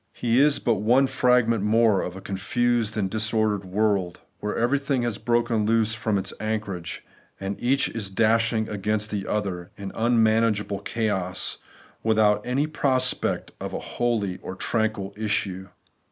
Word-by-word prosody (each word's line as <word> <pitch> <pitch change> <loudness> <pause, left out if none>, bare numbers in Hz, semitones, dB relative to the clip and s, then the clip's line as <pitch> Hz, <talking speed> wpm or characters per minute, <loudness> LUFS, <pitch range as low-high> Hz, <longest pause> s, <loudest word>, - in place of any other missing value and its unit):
He 120 +1 +1
is 145 +1 +5
but 110 -5 0
one 125 +6 +4
fragment 125 -4 +2
more 110 -2 +3
of 90 - -5
a 95 - -8
con 95 - -5
fused 115 +2 0
and 100 -3 +1
disordered 110 -1 0
world, 95 -2 0 0.2
where 105 0 -3
everything 135 +1 +1
has 120 -4 -2
broken 120 -2 +1
loose 110 0 +2
from 110 -2 -1
its 95 0 -3
anchorage, 105 -6 -4 0.3
and 95 +1 -3
each 135 +3 +2
is 110 -4 -5
dash 115 +3 +2
ing 110 -2 -1
against 105 +1 -2
the 100 -2 -3
other 95 -4 -2
in 100 -1 -6
unmanageable 110 -3 +2
chaos, 100 -5 -1 0.4
with 110 -1 +1
out 105 -1 +4
any 130 +4 0
prospect 135 -4 0
of - - -4
a - - -2 0.2
holy 110 -6 0
or 95 - -6
tranquil 110 -1 -1
issue. 100 -3 -2
110 Hz, 155 wpm, -25 LUFS, 100-120 Hz, 0.4 s, is